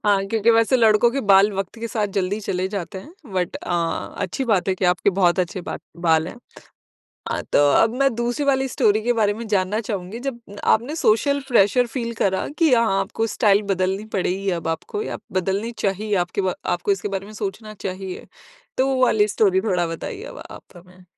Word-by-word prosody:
हाँ, 200 Hz, -2 st, +3 dB
क्योंकि 225 Hz, +2 st, +2 dB
वैसे 230 Hz, +3 st, +4 dB
लड़कों 225 Hz, 0 st, +4 dB
के 275 Hz, +3 st, -2 dB
बाल 195 Hz, +2 st, +7 dB
वक़्त 195 Hz, -2 st, -4 dB
के 230 Hz, -, -3 dB
साथ 215 Hz, -2 st, -1 dB
जल्दी 195 Hz, +2 st, -1 dB
चले 185 Hz, -2 st, -2 dB
जाते 190 Hz, -2 st, -5 dB
हैं, 250 Hz, -, -12 dB, 0.2 s
बट 180 Hz, -2 st, -1 dB
अ, 170 Hz, -2 st, -2 dB
अच्छी 265 Hz, +9 st, -2 dB
बात 205 Hz, -6 st, +1 dB
है 190 Hz, -, +2 dB
कि 185 Hz, -, -3 dB
आपके 180 Hz, +2 st, +3 dB
बहुत 175 Hz, -1 st, +3 dB
अच्छे 185 Hz, +1 st, -3 dB
बा -, -, -5 dB, 0.2 s
बाल 165 Hz, -1 st, +2 dB
हैं। -, -, -9 dB, 0.9 s
हाँ, -, -, -2 dB
तो -, -, +5 dB
अब 225 Hz, +1 st, +3 dB
मैं 275 Hz, -3 st, +3 dB
दूसरी 240 Hz, +5 st, -1 dB
वाली 265 Hz, -1 st, +2 dB
स्टोरी 215 Hz, -3 st, +2 dB
के 245 Hz, -, +2 dB
बारे 215 Hz, -3 st, +2 dB
में 230 Hz, +2 st, -7 dB
जानना 205 Hz, +1 st, +1 dB
चाहूँगी, 205 Hz, -1 st, -5 dB
जब 260 Hz, -2 st, -4 dB, 0.2 s
आपने 245 Hz, +8 st, +2 dB
सोशल 280 Hz, +2 st, +2 dB
प्रेशर 240 Hz, +1 st, +4 dB
फ़ील 235 Hz, -1 st, -4 dB
करा 190 Hz, -1 st, +1 dB
कि 325 Hz, -5 st, +4 dB
हाँ, 230 Hz, -5 st, +2 dB
आपको 215 Hz, +3 st, -2 dB
स्टाइल 210 Hz, -2 st, +3 dB
बदलनी 190 Hz, +2 st, -1 dB
पड़ेगी 190 Hz, +1 st, -1 dB
अब 170 Hz, -2 st, -3 dB
आपको 165 Hz, -, -3 dB
या -, -, -5 dB
बदलनी 195 Hz, +5 st, -1 dB
चाहिए। 205 Hz, +2 st, -1 dB
आपके 175 Hz, +2 st, -1 dB
व 185 Hz, -1 st, 0 dB
आपको 175 Hz, +3 st, +1 dB
इसके 195 Hz, +1 st, -3 dB
बारे 195 Hz, 0 st, -4 dB
में 215 Hz, -, -11 dB
सोचना 215 Hz, +1 st, -5 dB
चाहिए। 190 Hz, -1 st, -6 dB, 0.5 s
तो 260 Hz, -, +3 dB
वो 265 Hz, -1 st, +1 dB
वाली 215 Hz, -4 st, +3 dB
स्टोरी 195 Hz, -3 st, +2 dB
थोड़ा 185 Hz, -5 st, 0 dB
बताइए 385 Hz, -, -6 dB
अब -, -, -9 dB
आप -, -, -10 dB
हमें। 180 Hz, +1 st, -17 dB
205 Hz, 200 wpm, -22 LUFS, 185-230 Hz, 0.9 s, बाल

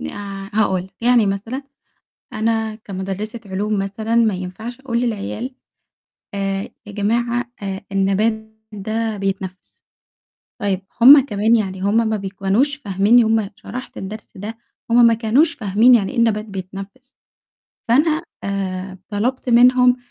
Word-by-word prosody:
ن -, -, -5 dB
آآ 195 Hz, -1 st, -7 dB
هاقول 190 Hz, -4 st, +1 dB
لك، 190 Hz, -, -18 dB
يعني 240 Hz, -2 st, +4 dB
مثلًا 215 Hz, +7 st, -3 dB, 0.7 s
أنا 220 Hz, 0 st, -1 dB
كمُدرسة 205 Hz, +2 st, -6 dB
علوم 205 Hz, +2 st, -1 dB
مثلًا 205 Hz, +3 st, -2 dB
ما 230 Hz, -3 st, +3 dB
ينفعش 200 Hz, +7 st, -7 dB
أقول 240 Hz, -3 st, -1 dB
للعيال، 235 Hz, +2 st, -3 dB, 0.8 s
آآ 195 Hz, 0 st, -1 dB, 0.2 s
يا 205 Hz, -, -9 dB
جماعة 235 Hz, +4 st, 0 dB
آآ 195 Hz, -1 st, -4 dB
النبات 220 Hz, +3 st, 0 dB, 0.2 s
ده 215 Hz, +2 st, -3 dB
بيتنفّس. 190 Hz, -1 st, -5 dB, 0.8 s
طيب 195 Hz, -2 st, 0 dB, 0.2 s
هُم 270 Hz, +2 st, +9 dB
كمان 220 Hz, -1 st, +2 dB
يعني 190 Hz, -4 st, -2 dB
هُم 200 Hz, +3 st, +2 dB
ما 220 Hz, -, 0 dB
بيكونوش 200 Hz, +8 st, 0 dB
فاهميني، 210 Hz, -1 st, +3 dB
هُم 220 Hz, -2 st, +1 dB
شرحت 255 Hz, +6 st, -8 dB
الدرس 210 Hz, +3 st, -7 dB
ده، 210 Hz, +4 st, -7 dB, 0.3 s
هُم 240 Hz, 0 st, +7 dB
ما 230 Hz, -, +6 dB
كانوش 235 Hz, +9 st, +2 dB
فاهمين 230 Hz, -1 st, +4 dB
يعني 200 Hz, -5 st, +1 dB
إيه 265 Hz, -, -7 dB
النبات 225 Hz, -2 st, +2 dB
بيتنفّس. 195 Hz, +7 st, -9 dB, 0.7 s
فأنا 305 Hz, +7 st, +3 dB, 0.2 s
آآ 190 Hz, -1 st, -3 dB
طلبت 245 Hz, +5 st, -2 dB
منهم 250 Hz, +1 st, +5 dB
215 Hz, 135 wpm, -20 LUFS, 195-235 Hz, 0.8 s, هُم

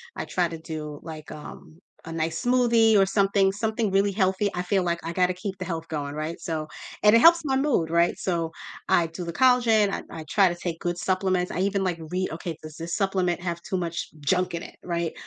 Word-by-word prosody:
I -, -, -4 dB
try 180 Hz, -2 st, 0 dB
to 165 Hz, 0 st, -7 dB
do, 155 Hz, -2 st, -7 dB
like, 155 Hz, -2 st, -9 dB
um, 155 Hz, +1 st, -11 dB, 0.3 s
a 165 Hz, -, -7 dB
nice 165 Hz, +7 st, -2 dB
smoothie 235 Hz, -3 st, +4 dB
or 195 Hz, -, +5 dB
something- 195 Hz, 0 st, +2 dB
something 220 Hz, +1 st, -1 dB
really 195 Hz, +1 st, +3 dB
healthy. 190 Hz, +1 st, +1 dB
I 180 Hz, -, -1 dB
feel 190 Hz, +1 st, +1 dB
like 170 Hz, -1 st, -1 dB
I 170 Hz, -, -3 dB
gotta 180 Hz, 0 st, +2 dB
keep 190 Hz, +1 st, -5 dB
the 185 Hz, -, -4 dB
health 165 Hz, -2 st, -4 dB
going, 145 Hz, -2 st, -4 dB
right, 155 Hz, +2 st, -4 dB
so, 155 Hz, -2 st, -3 dB, 0.4 s
and 210 Hz, +2 st, +7 dB
it -, -, +7 dB
helps 335 Hz, +4 st, +6 dB
my 265 Hz, -1 st, +1 dB
mood, 265 Hz, -, +1 dB
right, 170 Hz, +1 st, +2 dB
so, 165 Hz, -3 st, -1 dB, 0.4 s
I 170 Hz, -1 st, +4 dB
do 165 Hz, +2 st, -7 dB
the 170 Hz, -, -5 dB
collagen, 235 Hz, -5 st, +4 dB
I -, -, -2 dB, 0.2 s
I -, -, -10 dB
try 195 Hz, +1 st, +4 dB
to 175 Hz, -, -3 dB
take 175 Hz, -1 st, -5 dB
good 175 Hz, 0 st, -2 dB
supplements. 185 Hz, -1 st, 0 dB
I -, -, -3 dB
even, 195 Hz, 0 st, +1 dB
like, 175 Hz, -3 st, -1 dB
read, 185 Hz, -1 st, -1 dB
"Okay, 165 Hz, 0 st, -5 dB
does 155 Hz, -1 st, -9 dB
this 165 Hz, +1 st, -4 dB
supplement 190 Hz, -4 st, 0 dB
have 170 Hz, -1 st, -3 dB
too 190 Hz, -, -3 dB
much 170 Hz, -2 st, -3 dB
junk 180 Hz, +6 st, 0 dB
in 170 Hz, -, -5 dB
it", -, -, -11 dB
right, 170 Hz, -2 st, -2 dB
180 Hz, 230 wpm, -25 LUFS, 165-200 Hz, 0.4 s, and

